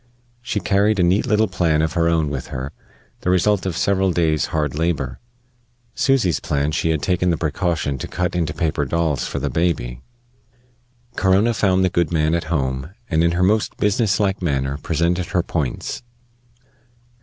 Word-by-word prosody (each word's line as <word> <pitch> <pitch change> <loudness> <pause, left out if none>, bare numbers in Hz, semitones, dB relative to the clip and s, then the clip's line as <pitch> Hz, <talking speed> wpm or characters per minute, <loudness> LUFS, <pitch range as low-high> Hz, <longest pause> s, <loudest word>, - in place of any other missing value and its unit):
She 120 -3 -2
carried 100 +1 +2
a - - +4
neat 90 +4 +2
little 110 0 +3
plan 85 -5 +1
of 80 0 -1
her 85 -1 +2
own 80 -3 +1
with 70 -3 -4
her, 65 +1 -5 0.5
the - - -2
result 95 +2 +2
of 90 - -3
several 95 -1 +2
days' 80 -3 +1
hard 75 -3 -1
labor. 75 -5 -2 0.7
Susy's 125 - +2
plan 70 0 -1
she 80 +1 0
had 80 -3 0
taken 90 +1 +1
the 85 - +1
precaution 80 -3 -1
to - - -5
cut 90 0 -2
into 85 -4 0
paper 75 -2 -1
dolls 80 -3 0
for - - -4
the - - -2
baby. 70 -8 -1 1.1
Corona 100 +5 +3
found 95 -3 +2
the - - +2
good 85 -2 +1
man 80 -1 +1
at 85 -2 0
home, 65 -3 -2 0.2
and 80 0 +3
in 85 0 +2
her 90 +1 +1
most 105 +3 +1
business 105 0 +1
like 100 -2 0
manner 70 -4 -1
presented 85 +3 0
her 90 - 0
points. 75 -9 -3
85 Hz, 175 wpm, -21 LUFS, 75-95 Hz, 1.1 s, a